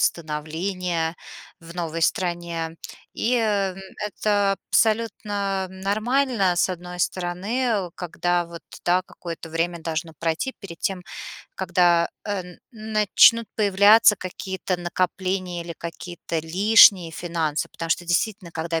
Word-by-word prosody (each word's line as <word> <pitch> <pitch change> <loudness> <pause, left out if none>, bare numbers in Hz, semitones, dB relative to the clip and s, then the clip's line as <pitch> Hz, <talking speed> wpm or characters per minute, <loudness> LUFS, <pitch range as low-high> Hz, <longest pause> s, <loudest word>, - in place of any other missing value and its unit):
становления 165 +2 -1 0.5
в 165 0 -11
новой 165 -1 -3
стране. 170 -2 -1 0.4
И, 245 +1 +1
ам, 200 -4 0 0.3
это 205 -1 +1
абсолютно 205 -3 +1
нормально, 210 +1 +1
с 185 - +3
одной 180 0 -6
стороны, 190 +3 -1
когда 175 0 -1
вот, 170 0 -10 0.2
да, 180 +1 +3
какое-то 165 -1 -8
время 170 +1 -1
должно 160 0 -4
пройти 170 +11 -1
перед 175 -5 -10
тем, 190 -2 -2 0.5
когда, 175 -2 +3 0.2
э, 205 -3 -2
н 180 0 -13
начнут 220 +1 +4
появляться 210 +1 +6
какие-то 185 0 -4
накопления 180 0 -2
или 170 -1 -7
какие-то 170 -1 -5
лишние 185 +1 +6
финансы. 165 -3 -2
Потому 165 0 -6
что, 175 - +1
действительно, 185 +1 -1
когда 165 0 -2
180 Hz, 115 wpm, -24 LUFS, 170-200 Hz, 0.5 s, появляться